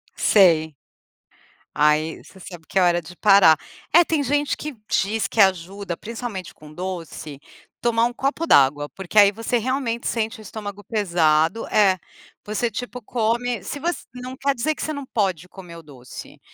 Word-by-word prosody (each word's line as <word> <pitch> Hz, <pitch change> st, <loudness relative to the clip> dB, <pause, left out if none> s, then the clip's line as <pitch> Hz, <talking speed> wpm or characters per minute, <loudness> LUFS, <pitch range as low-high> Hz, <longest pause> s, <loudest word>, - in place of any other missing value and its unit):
Sei. 165 Hz, -6 st, +4 dB, 1.0 s
Aí 150 Hz, +2 st, +1 dB
você 190 Hz, -, -17 dB
sabe 175 Hz, -3 st, -11 dB
que 195 Hz, -, 0 dB
é -, -, +4 dB
hora 175 Hz, -1 st, +3 dB
de 175 Hz, +2 st, -13 dB
parar. 195 Hz, -6 st, +6 dB, 0.4 s
É 345 Hz, +2 st, +8 dB
tem 315 Hz, -3 st, 0 dB
gente 290 Hz, +2 st, 0 dB
que 300 Hz, -2 st, -6 dB
diz 215 Hz, +3 st, 0 dB
que 225 Hz, -, -6 dB
ajuda 190 Hz, -1 st, +1 dB
principalmente 225 Hz, -5 st, -7 dB
com 150 Hz, 0 st, -15 dB
doce, 165 Hz, -5 st, -7 dB, 0.4 s
tomar 230 Hz, -1 st, +2 dB
1 240 Hz, -, -2 dB
copo 275 Hz, +6 st, -2 dB
d'água. 145 Hz, -, +4 dB
Porque 190 Hz, +2 st, -7 dB
aí 200 Hz, -1 st, +7 dB
você 225 Hz, +3 st, -1 dB
realmente 240 Hz, -1 st, -2 dB
sente 225 Hz, 0 st, -2 dB
o -, -, -10 dB
estômago 205 Hz, -1 st, -8 dB
pesado 170 Hz, -2 st, +1 dB
é, 190 Hz, -3 st, +3 dB, 0.5 s
você 220 Hz, +3 st, -2 dB
tipo 245 Hz, +3 st, -6 dB
come, 235 Hz, -1 st, -1 dB
se 285 Hz, -, -6 dB
você 345 Hz, +4 st, -3 dB
não 250 Hz, +1 st, -7 dB
quer 280 Hz, 0 st, 0 dB
dizer 310 Hz, +7 st, 0 dB
que -, -, -8 dB
você 310 Hz, -, -2 dB
não 285 Hz, -2 st, -6 dB
pode 190 Hz, -8 st, -1 dB
comer 180 Hz, -3 st, -12 dB
o 165 Hz, -, -12 dB
doce, 130 Hz, -5 st, -12 dB
205 Hz, 170 wpm, -22 LUFS, 170-240 Hz, 1.0 s, É